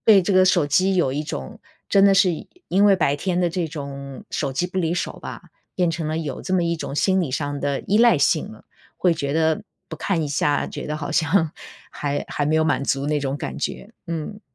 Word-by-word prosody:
对 200 -4 +7
这 200 - 0
个 185 0 +6
手 175 -5 +3
机 185 +6 +2
有 135 -7 +2
一 150 +2 -2
种 65 - -6 0.3
真 195 - +5
的 195 - +5
是 190 -1 +5 0.4
因 200 +3 +4
为 195 - +6
白 150 -5 +2
天 180 +4 -1
的 175 -1 +1
这 170 -1 -2
种 140 -3 -7
手 140 -3 -2
机 175 +6 0
不 185 +1 -4
离 170 -1 0
手 - - -3
吧， - - -8 0.3
变 180 -2 +1
成 160 -1 -3
了 155 - -1
有 150 -5 -4
这 185 - -2
么 180 -2 +2
一 170 0 0
种 155 - -5
心 190 +5 +2
理 165 -7 -2
上 145 +1 -2
的 140 -1 -1
依 210 +3 +1
赖 235 0 +6
性 - - +1
了， - - -14 0.3
会 180 -2 +3
觉 140 -3 -2
得 160 +1 +2 0.3
不 - - -6
看 175 -5 -1
一 - - -1
下， 145 0 +1
觉 - - -6
得 150 - -3
好 145 -1 -5
像 165 0 +2 0.4
还 145 0 -3
还 145 - -1
没 155 +1 +2
有 160 - +3
满 155 -3 +1
足 135 +1 0
那 150 0 0
种 135 0 -2
感 - - -5
觉， 205 - -4 0.2
嗯。 170 +5 -5
160 Hz, 255 characters per minute, -22 LUFS, 145-185 Hz, 0.4 s, 对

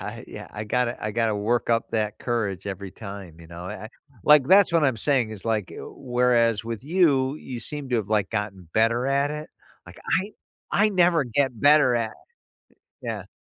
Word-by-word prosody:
I - - -7
yeah, - - -9
I 105 +1 -5
gotta 120 +2 0
I 110 - -1
gotta 115 -1 0
work 115 +4 0
up 115 0 +1
that 105 -2 -2
courage 105 -6 -2
every 100 0 -5
time, 100 -5 -10
you 85 - -13
know. 85 +1 -9
I 105 +2 -7
I - - -7 0.4
like, 150 -3 +6
that's 195 -2 +6
what 165 -2 +3
I'm 130 -4 +2
saying 125 -1 +1
is 110 -1 -8
like, 110 -4 0
w - - -9
whereas 120 -3 +1
with 115 0 -5
you, 145 -5 +2
you 125 -5 -7
seem 145 +3 -6
to 120 - +2
have, 105 -3 -2
like, 105 -3 +1
gotten 105 -5 -4
better 115 +3 +2
at 140 +1 +1
it. 150 +1 -6 0.4
Like, - - -13 0.2
I 200 +2 -8 0.4
I 210 +1 +3
never 175 -6 +3
get 125 0 0
better 145 -4 +5
at 115 -2 -1 0.9
Yeah. - - -5
115 Hz, 195 wpm, -24 LUFS, 105-140 Hz, 0.9 s, like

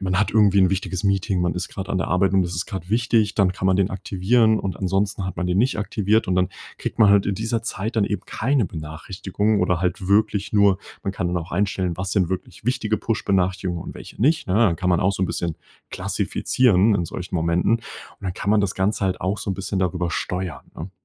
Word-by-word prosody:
man 95 -1 0
hat 105 - +1
irgendwie 105 -3 +4
'n 95 - +5
wichtiges 95 -1 -2
Meeting. 100 -1 +1
Man 90 -1 0
ist 90 0 -3
grad 95 -1 -6
an - - -1
der 85 - -2
Arbeit 95 +3 +2
und 95 - +4
das 90 0 -3
ist 85 -1 -2
grad 95 -2 -7
wichtig. 115 -2 +2
Dann 95 -3 +3
kann 95 - -7
man 95 - +4
den 95 -1 +2
aktivieren 105 +4 +2
und 95 -1 -3
ansonsten 100 +1 0
hat 95 - -5
man 90 - -1
den 90 0 0
nicht 125 +1 +2
aktiviert. 105 0 +1
Und 95 - +1
dann 90 -1 +2 0.3
kriegt - - -5
man 110 -3 +6
halt 100 -1 +5
in 100 - 0
dieser 115 +3 -2
Zeit 110 +1 -4
dann 105 - +3
eben 105 0 -2
keine 130 -2 0
Benachrichtigungen 90 +6 -2
oder 90 -1 +1
halt 90 +1 -1
wirklich 105 0 +2
nur 100 -2 +5 0.3
man 95 - -1
kann 95 -2 -2
dann 90 - -1
auch 85 +3 -8
einstellen: 95 -2 0
Was 95 +1 -3
sind 95 -5 +2
wirklich 95 +2 -6
wichtige 115 -4 0
Push-Benachrichtigungen 95 -5 -1
und - - -8
welche - - -11
nicht, 155 +6 +2
ne? 90 - 0
Dann 105 -7 +4
kann 90 +2 0
man 90 - +3
auch 95 +2 +2
so 95 - -2
'n - - +2
bisschen 85 -1 -3 0.3
klassifizieren 110 -4 +2
in 90 - 0
solchen 90 +2 -7
Momenten. 85 +5 +1
Und - - -16 0.4
dann 95 -2 -3
kann 100 - -2
man 105 0 +4
das 100 -2 -1
Ganze 100 +1 0
halt 95 - -2
auch 95 +3 -1
so - - -3
'n - - -1
bisschen 95 +1 -3
darüber 90 -2 -1
steuern, 90 -3 -3
ne? 85 +5 -6
95 Hz, 240 wpm, -22 LUFS, 90-105 Hz, 0.4 s, man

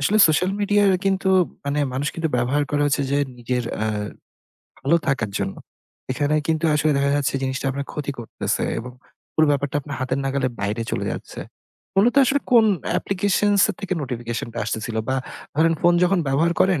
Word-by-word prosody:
আসলে 195 +10 +2
social 180 +4 +2
media 205 0 +3 0.2
কিন্তু 195 0 +1 0.4
মানে 140 +1 -1
মানুষ 140 +4 -1
কিন্তু 165 -1 -1
ব্যবহার 130 +5 +1
করে 145 0 0
হচ্ছে 140 0 +1
যে 140 - +2 0.2
নিজের 125 0 -2 0.2
আ - - +1 1.0
ভালো 165 +5 +3
থাকার 120 -8 0
জন্য। - - -2 0.6
এখানে 145 +3 0
কিন্তু 160 0 0
আসলে 150 +1 +2
দেখা 140 0 +2
যাচ্ছে 140 -1 0
জিনিসটা 135 +1 -2
আপনার 140 +1 -4
ক্ষতি 145 -1 -3
করতেছে 115 - -3 0.2
এবং 125 +2 -7 0.4
পুরো 155 0 +4
ব্যাপারটা 145 0 0
আপনার 140 0 -7
হাতের 130 +1 -1
নাগালে 135 -1 0
বাইরে 105 +3 -1
চলে - - -2
যাচ্ছে। - - -7 0.6
মূলত 235 +6 +4
আসলে 280 +2 +2
কোন 230 -2 +7 0.3
application 200 +1 +1 0.3
থেকে 195 -2 -3
notification 120 -3 -4
টা - - -4
আসতেছিল 110 +1 -3
বা 130 - +1 0.4
ধরেন 165 +2 +3
phone 175 0 +4
যখন 185 +1 +2
ব্যবহার 160 +5 +2
করেন 185 -6 +3
145 Hz, 170 wpm, -22 LUFS, 130-170 Hz, 1.0 s, কোন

